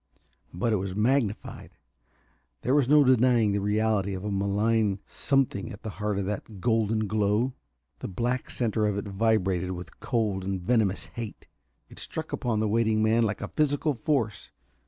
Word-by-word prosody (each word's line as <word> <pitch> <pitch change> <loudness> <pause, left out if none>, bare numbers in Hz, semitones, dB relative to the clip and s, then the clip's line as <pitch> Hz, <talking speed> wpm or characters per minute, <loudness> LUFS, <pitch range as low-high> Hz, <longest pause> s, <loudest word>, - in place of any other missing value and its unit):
But 110 +6 0
it - - +3
was 95 0 -4
magnified. 110 -1 -1 0.9
There 125 - +1
was 140 -3 +3
no 150 0 +7
denying 125 -4 +4
the 100 0 0
reality 105 -1 +1
of 95 - -6
a 105 - -2
malign 100 +1 +1
something 135 -9 0
at - - -10
the 110 - -4
heart 105 -1 0
of 100 - -1
that 105 +1 -5
golden 110 0 +1
glow. 105 +4 +1 0.5
The - - -5
black 120 +6 -2
center 110 -3 0
of 100 -1 -1
it 100 - -3
vibrated 95 -3 +1
with 90 0 -9
cold 105 -6 -1
and 95 0 -2
venomous 100 0 +1
hate. 115 -3 -7 0.4
It - - -13
struck - - -6
upon 115 -3 -1
the 110 - +1
waiting 110 0 +2
man 110 +2 +3
like 105 -2 0
a - - -3
physical 150 0 +1
force. 120 -4 -1
110 Hz, 170 wpm, -27 LUFS, 100-120 Hz, 0.9 s, no